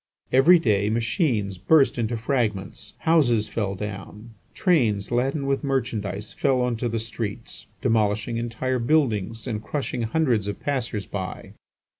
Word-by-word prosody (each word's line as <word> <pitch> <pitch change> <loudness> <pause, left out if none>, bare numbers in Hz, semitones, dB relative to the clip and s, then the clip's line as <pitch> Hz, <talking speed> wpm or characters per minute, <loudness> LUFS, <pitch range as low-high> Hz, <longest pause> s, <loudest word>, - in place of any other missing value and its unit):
Every 155 +8 +7
day, 105 -9 +1
machines 115 - 0
burst 135 - +4
into 115 0 -1
fragments, 110 -5 -2
houses 125 -10 +3
fell 100 -3 -2
down, 105 +3 -7 0.2
trains 115 - +2
laden 135 +4 0
with 135 +2 0
merchandise 110 -7 -2
fell 130 -2 +1
on 125 -1 0
to 120 +1 -1
the 115 - -2
streets, 110 -2 -6 0.2
demolishing 110 0 +1
entire 120 +2 -2
buildings 115 -5 +1
and 110 -4 -3
crushing 130 0 -3
hundreds 115 -4 +1
of 100 - -4
passers 120 -7 -2
by. 95 -2 -6
115 Hz, 135 wpm, -24 LUFS, 105-130 Hz, 0.2 s, Every